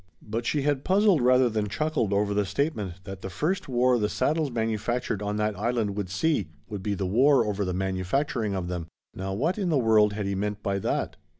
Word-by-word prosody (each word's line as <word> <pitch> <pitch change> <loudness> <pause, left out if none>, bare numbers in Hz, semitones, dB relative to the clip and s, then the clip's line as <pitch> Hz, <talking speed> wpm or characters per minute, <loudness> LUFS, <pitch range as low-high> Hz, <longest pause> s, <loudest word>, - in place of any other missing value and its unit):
But 115 +3 -3
she 145 -2 +1
had 145 -2 0
puzzled 195 -4 +4
rather 125 +1 +5
than 105 -2 -1
chuckled 155 -4 -1
over 100 0 +1
the 105 0 +2
statement 100 - -2
that 95 -1 -8
the 95 - -5
first 155 - -2
war 125 0 +3
the 105 -1 0
saddles 155 +4 0
manufactured 115 -1 -1
on 105 0 -2
that 105 0 0
Island 110 -2 -1
would 100 -3 -3
see 145 - 0 0.2
would 105 -3 -6
be 100 +1 -1
the 95 - -2
war 125 +6 +4
over 105 -1 -1
the 90 - -2
manufacturing 95 +5 -1
of 90 -2 -3
them. 90 -2 -4 0.3
Now 95 0 -4
what 165 - 0
in 190 -3 0
the 155 - +3
world 110 -4 +4
had 105 -1 -3
he 100 - -1
meant 105 +1 -3
by 100 0 0
that? - - -2
105 Hz, 215 wpm, -26 LUFS, 100-130 Hz, 0.3 s, rather